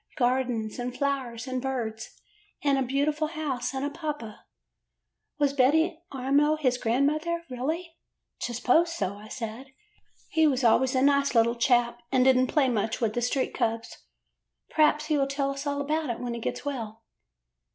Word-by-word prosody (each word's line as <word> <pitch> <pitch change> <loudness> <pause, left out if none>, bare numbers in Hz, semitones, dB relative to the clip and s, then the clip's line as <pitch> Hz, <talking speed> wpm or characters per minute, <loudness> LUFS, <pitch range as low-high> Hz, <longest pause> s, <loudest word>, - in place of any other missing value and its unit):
Gardens, 245 -4 0
and 245 0 -4
flowers, 265 -5 -2
and 255 -1 -3
birds, 230 -4 -4 0.4
and 280 -2 +3
a - - 0
beautiful 285 +4 0
house 300 -6 -3
and 265 +1 -3
a 290 - -2
papa. 295 -9 -6 0.9
Was 285 -2 +2
Betty 315 +6 +3
Amo 280 +3 +2
his 255 -5 0
grandmother, 305 +8 0
really?' 320 +7 -3 0.2
" - - -56
T 240 - -2
s'pose 320 +8 +3
so,' 200 - -3
I 215 - -11
said. 240 +3 -7 0.6
'He 320 -1 +3
was 270 -3 +1
always 255 +3 +4
a 260 - +3
nice 280 -1 +3
little 230 0 +4
chap 240 -1 +2
and 260 -1 +3
did 265 -1 +6
n't 255 0 +2
play 295 -4 +3
much 220 -2 -1
with 225 -3 0
the 240 - -1
street 250 +2 0
cubs. 225 0 -2 0.8
P'raps 300 -1 +3
he 305 -2 +1
will 275 - +2
tell 275 0 -1
us 275 +1 -5
all 285 0 -1
about 300 +1 -1
it 235 - -3
when 245 -1 -3
he 235 - -4
gets 230 - -4
well. 230 -5 -5
265 Hz, 175 wpm, -27 LUFS, 240-290 Hz, 0.9 s, did